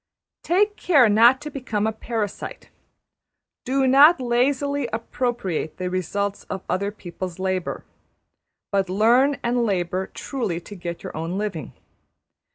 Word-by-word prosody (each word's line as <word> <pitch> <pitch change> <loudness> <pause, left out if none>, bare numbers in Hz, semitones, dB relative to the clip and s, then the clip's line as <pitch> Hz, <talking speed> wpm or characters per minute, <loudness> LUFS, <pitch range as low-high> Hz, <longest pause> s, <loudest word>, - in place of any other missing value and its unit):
} - - -67
Take 415 +4 +1
care 285 -9 +5
not 235 +5 +6
to 300 0 -6
become 230 -7 -2
a 220 - +1
parasite; 220 -2 -5 0.9
do 265 +1 +1
not 280 +5 +7
lazily 265 +2 0
appropriate 230 -7 -3
the 180 -1 -3
results 200 +2 -2
of 190 - -6
other 200 +2 -1
people's 185 -3 -7
labour, 185 -1 -2 0.9
but 195 -2 +1
learn 240 +8 +3
and 240 0 +1
labour 185 -3 -1
truly 225 -11 -4
to 190 - -12
get 175 -3 -6
your - - -7
own 165 +4 -3
living. 195 - -4
220 Hz, 135 wpm, -23 LUFS, 185-260 Hz, 0.9 s, not